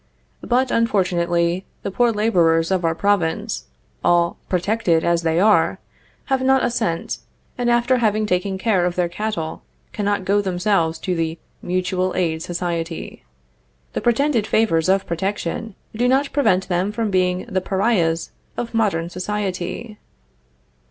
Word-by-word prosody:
But, 250 +1 +1
unfortunately, 175 -5 +1 0.2
the 200 - -3
poor 240 +4 +3
laborers 175 -6 +2
of 185 -2 +1
our 165 0 +1
province, 200 +2 0 0.4
all 170 0 +3
protected 180 -2 +1
as 170 -1 +2
they 165 0 +1
are, 210 +2 +4 0.5
have 265 -1 0
not 265 0 +3
a 240 - +1
cent, 215 -8 -2 0.4
and, 245 -1 0
after 240 +2 +3
having 215 -1 +2
taken 190 0 0
care 190 -3 +2
of 175 - -3
their 180 -1 +1
cattle, 170 -3 -4 0.3
cannot 205 -2 -1
go 205 +2 +3
themselves 180 -3 +1
to 185 - -2
the 165 0 -2 0.2
Mutual 185 +1 -1
Aid 160 -3 0
Society. 170 -1 -4 0.7
The - - -2
pretended 240 -2 +2
favors 185 -7 +2
of 195 0 +3
protection 190 +4 -3 0.2
do 240 +3 +1
not 270 +2 +2
prevent 210 -10 +2
them 180 +2 0
from 215 0 -2
being 185 -1 +1
the 185 - -1
pariahs 185 -4 +1 0.3
of 235 -1 -4
modern 200 -7 +1
society. 190 +3 -4
190 Hz, 140 wpm, -21 LUFS, 170-220 Hz, 0.7 s, are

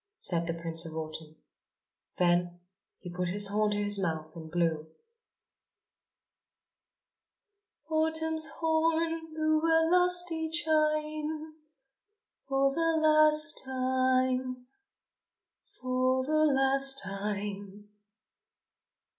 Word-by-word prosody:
said 170 -1 0
the 165 - -2
Prince 165 0 +1
of 160 - -9
Autumn. 155 0 -7 0.8
Then 175 0 +1 0.4
he 180 -2 -10
put 180 0 -3
his 200 +3 +2
horn 210 +1 +1
to 205 - -1
his 205 0 +1
mouth 160 -4 -4
and 160 -1 -10
blew. 160 -2 -1 3.0
Autumn's 320 0 +1
horn 325 0 -1
blew 310 0 0
a 325 0 +3
lusty 355 -3 +1
chime, 310 -1 -1 0.9
For 275 0 +1
the 330 +1 0
last 310 0 +3
time, 255 -1 -1 1.1
for 255 0 0
the 310 +2 +2
last 270 0 +3
time! 200 0 -6
260 Hz, 90 wpm, -29 LUFS, 195-315 Hz, 3.0 s, a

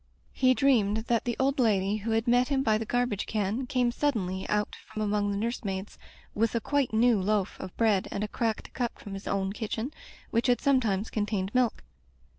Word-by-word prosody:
He 255 -1 +3
dreamed 225 -7 +3
that 235 -2 +2
the 240 -1 -1
old 270 +1 +1
lady 205 -3 +2
who 215 +2 -5
had 225 +1 +1
met 245 +1 +4
him 270 -2 +1
by 215 -4 +2
the 225 - -4
garbage 245 -4 0
can 215 +4 -1
came* 250 -1 +1
suddenly 200 -10 -1
out 210 0 0
from 215 - -4
among 205 -1 +1
the 200 - -1
nurse 235 +4 -2
maids, 195 0 -5 0.3
with 225 +2 0
a - - +3
quite 285 +2 0
new 225 -1 +3
loaf 205 0 0
of 185 - -8
bread 215 -5 +2
and 200 - -3
a - - -1
cracked 225 0 -2
cup 240 -2 -2
from 200 - -9
his 195 0 -7
own 195 0 -1
kitchen, 225 +5 -4 0.4
which 230 +3 +1
had 245 -1 +3
sometimes 225 -7 +1
contained 205 -2 -1
milk. 250 -2 +1
220 Hz, 205 wpm, -28 LUFS, 205-245 Hz, 0.4 s, met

